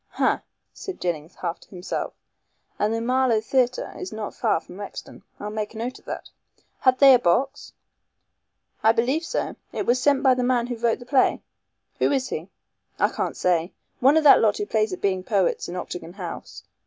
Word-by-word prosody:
"Ha!" - - +1 0.3
said 385 - -7
Jennings 165 -2 -3
half 170 - -4
to - - -20
himself, 180 -1 -4 0.6
"and 210 +1 +2
the 225 - 0
Marlow 250 -1 +2
Theatre 250 +2 0
is 185 - -6
not 215 -1 -5
far - - +1
from 180 +3 -13
Rexton. 205 - -8 0.2
I'll 210 +1 -5
make 215 0 -4
a - - -7
note 245 +3 -4
of - - -28
that. - - -6 0.5
Had 255 -1 +4
they 275 0 +8
a 250 - +6
box?" 270 +9 0 1.1
"I 220 - +5
believe 255 +8 +1
so. - - -2 0.2
It - - -3
was 250 +1 +2
sent 280 0 +3
by 265 -2 +6
the 250 - -1
man 245 -1 +2
who 245 0 -4
wrote 230 0 +1
the 245 - -12
play." 260 0 +2 0.6
"Who - - +3
is 265 -2 0
he?" 165 +5 -5 0.5
"I - - +3
can't - - -3
say. 175 -1 +1 0.3
One 275 +5 +5
of 320 - +3
that 290 - +8
lot 215 -2 +3
who 205 - -2
play 215 0 +1
at 185 - -5
being 185 -2 0
poets 195 -4 0
in 175 - -5
Octagon 180 -1 -6
House. 180 -3 -8
225 Hz, 200 wpm, -24 LUFS, 190-255 Hz, 1.1 s, they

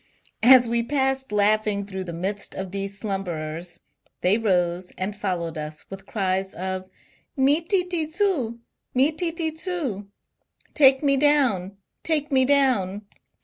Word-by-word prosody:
As 245 +1 +7
we 235 0 +2
passed 265 0 -1
laughing 210 0 +1
through 190 -2 -6
the 175 - -6
midst 195 +4 -4
of 190 -1 -5
these 195 0 -4
slumberers, 175 -4 -5 0.4
they 185 +3 +3
rose 180 -4 0
and 195 +2 -3
followed 175 -6 -3
us 150 0 -7
with 195 0 -9
cries 190 -2 -1
of 185 +1 -4 0.5
^^Mi 275 +3 +4
tUi 360 -5 +1
zu! 315 - 0 0.4
Mi 270 +4 +4
titi 330 0 -2
2u/'' 315 - -3 0.7
(Take 270 -1 +5
me 275 -1 +3
down 260 -10 +2
I - - -32 0.2
Take 305 -3 0
me 260 -1 +4
down 245 -8 +2
210 Hz, 140 wpm, -24 LUFS, 190-275 Hz, 0.7 s, As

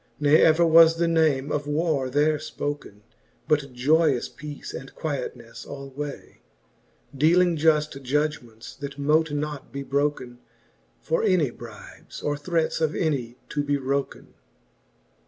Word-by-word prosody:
Ne 150 +1 +5
ever 160 +2 +5
was 165 0 +7
the 170 0 +1
name 155 -4 +2
of 145 0 -2
warre 150 -3 0
there 150 +3 +2
Ipoken, 145 -8 -6 0.5
But 150 -3 +1
joyous 140 +1 +2
peace 150 -1 -9
and 135 +1 -9
quietnefle 125 -6 -5
alway, 140 +1 -8 0.7
Dealing 170 +5 +4
juft 150 -2 +1
judgements, 135 -4 -3
that 140 0 -7
mote 155 +2 +2
not 145 -1 -4
be 140 0 -5
broken 140 -3 -2 0.6
For 160 - 0
any 185 - +2
brybes, - - -12
or 145 - 0
threates 165 +2 -1
of 155 -1 +1
any 130 -7 -1
to 145 -1 -1
be 145 0 0
wroken* 140 +1 -3
XXV. - - -28
145 Hz, 135 wpm, -25 LUFS, 140-155 Hz, 0.7 s, was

